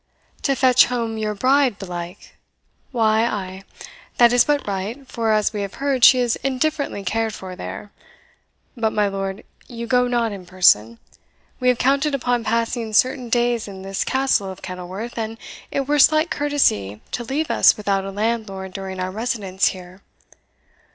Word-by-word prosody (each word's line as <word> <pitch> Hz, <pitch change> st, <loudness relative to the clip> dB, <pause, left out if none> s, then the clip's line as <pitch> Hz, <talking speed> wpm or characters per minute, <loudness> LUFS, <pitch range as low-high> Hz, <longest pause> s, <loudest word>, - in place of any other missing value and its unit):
"To 275 Hz, -, +1 dB
fetch 255 Hz, -1 st, +5 dB
home 230 Hz, -3 st, -3 dB
your 215 Hz, -1 st, -2 dB
bride 260 Hz, 0 st, +2 dB
belike? 175 Hz, -1 st, -8 dB, 0.6 s
Why, 220 Hz, -3 st, +2 dB
ay 190 Hz, -4 st, -3 dB, 0.6 s
that 240 Hz, 0 st, +6 dB
is 245 Hz, -1 st, +6 dB
but 290 Hz, -2 st, 0 dB
right, 205 Hz, +8 st, -4 dB
for, 230 Hz, -3 st, -1 dB
as 215 Hz, 0 st, +1 dB
we 205 Hz, -, -3 dB
have 200 Hz, -1 st, -5 dB
heard, 275 Hz, -3 st, -1 dB
she 255 Hz, -, +9 dB
is 245 Hz, -2 st, +1 dB
indifferently 275 Hz, -4 st, -2 dB
cared 220 Hz, +3 st, -1 dB
for 185 Hz, -1 st, -8 dB
there. 95 Hz, -, -8 dB, 0.8 s
But, 225 Hz, -3 st, -1 dB
my 210 Hz, -1 st, +2 dB
lord, 195 Hz, 0 st, -4 dB, 0.2 s
you 235 Hz, -1 st, -6 dB
go 250 Hz, +1 st, +2 dB
not 240 Hz, -2 st, 0 dB
in 190 Hz, -3 st, -9 dB
person; 115 Hz, -, +3 dB, 0.6 s
we 250 Hz, -, -1 dB
have 250 Hz, -1 st, +4 dB
counted 275 Hz, +3 st, +1 dB
upon 245 Hz, -3 st, -1 dB
passing 230 Hz, 0 st, -1 dB
certain 255 Hz, +2 st, +2 dB
days 240 Hz, -1 st, +1 dB
in 190 Hz, -1 st, -9 dB
this 195 Hz, 0 st, -2 dB
Castle 260 Hz, -7 st, 0 dB
of 190 Hz, -, -12 dB
Kenilworth, 185 Hz, +6 st, -6 dB
and 225 Hz, 0 st, -4 dB, 0.3 s
it 275 Hz, -, -1 dB
were 295 Hz, 0 st, +2 dB
slight 310 Hz, +4 st, +5 dB
courtesy 190 Hz, -, +1 dB
to 240 Hz, -, -3 dB
leave 285 Hz, +6 st, -2 dB
us -, -, +5 dB
without 200 Hz, -2 st, 0 dB
a 195 Hz, -, -5 dB
landlord 200 Hz, -2 st, -3 dB
during 190 Hz, -1 st, -6 dB
our 185 Hz, 0 st, -2 dB
residence 205 Hz, -3 st, -1 dB
here. 185 Hz, 0 st, -7 dB
225 Hz, 165 wpm, -21 LUFS, 195-250 Hz, 0.8 s, she